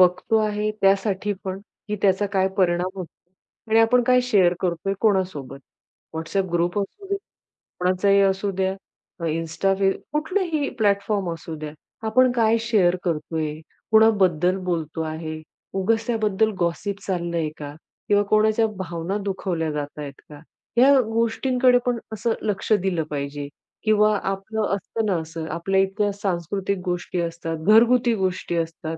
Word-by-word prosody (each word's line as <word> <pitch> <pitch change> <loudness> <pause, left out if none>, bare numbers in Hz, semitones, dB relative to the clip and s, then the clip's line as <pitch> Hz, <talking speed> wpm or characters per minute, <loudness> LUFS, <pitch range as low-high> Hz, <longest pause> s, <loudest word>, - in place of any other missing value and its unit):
बघतो 180 +4 +3
आहे, 210 0 0
त्यासाठी 195 +1 +2
पण, 190 0 -3 0.3
की 210 - -1
त्याचा 195 +1 +3
काय 190 -1 +2
परिणाम 180 -1 +2
होतो 180 -3 -5 0.6
आणि 220 - +5
आपण 245 +2 +4
काय 250 0 +5
शेअर 195 -8 +3
करतोय, 180 +2 -1
कोणासोबत. 185 - 0 0.6
WhatsApp 185 +3 -2
ग्रुप 175 +3 +1
असू 205 - -5
दे, 400 - +2 0.6
कोणाचाही 185 +2 +3
असू 195 +1 +1
द्या, 190 0 +1 0.5
Insta, 165 +4 0
फेस 195 -1 +3 0.2
कुठलाही 315 -1 0
प्लॅटफॉर्म 200 -2 +1
असू 165 0 -7
द्या, 155 -1 -6 0.4
आपण 255 +3 +4
काय 230 -2 +3
शेअर 210 -6 +2
करतोय, 160 -2 -2 0.4
कुणाबद्दल 190 -5 +4
बोलतो 165 -2 -2
आहे, 155 0 -5 0.3
उगाच 225 +4 +1
त्याबद्दल 220 -2 +1
गॉसिप 185 +3 -1
चाललंय 170 -4 -1
का? 145 -1 -7 0.3
किंवा 205 0 +4
कोणाच्या 215 +1 +4
भावना 175 +1 -3
दुखवल्या 180 -5 -2
जातायेत 145 -1 -6
का? 150 -1 -11 0.4
ह्या 270 +3 +7
गोष्टींकडे 245 +3 +2
पण 245 -2 0
असं 225 +2 0
लक्ष 210 0 -3
दिलं 185 -5 +1
पाहिजे. 145 0 -4 0.4
किंवा 215 -1 +4
आपलं 195 +3 -2
असतं 220 +3 -3
ना 200 -3 +1
असं, 160 0 -6
आपल्या 190 +3 0
इतक्या 205 +2 0
सांस्कृतिक 195 0 -2
गोष्टी 180 0 -2
असतात, 165 -1 -4
घरगुती 235 +2 +5
गोष्टी 185 -3 -2
असतात, 165 -1 -3
195 Hz, 135 wpm, -23 LUFS, 170-215 Hz, 0.6 s, ह्या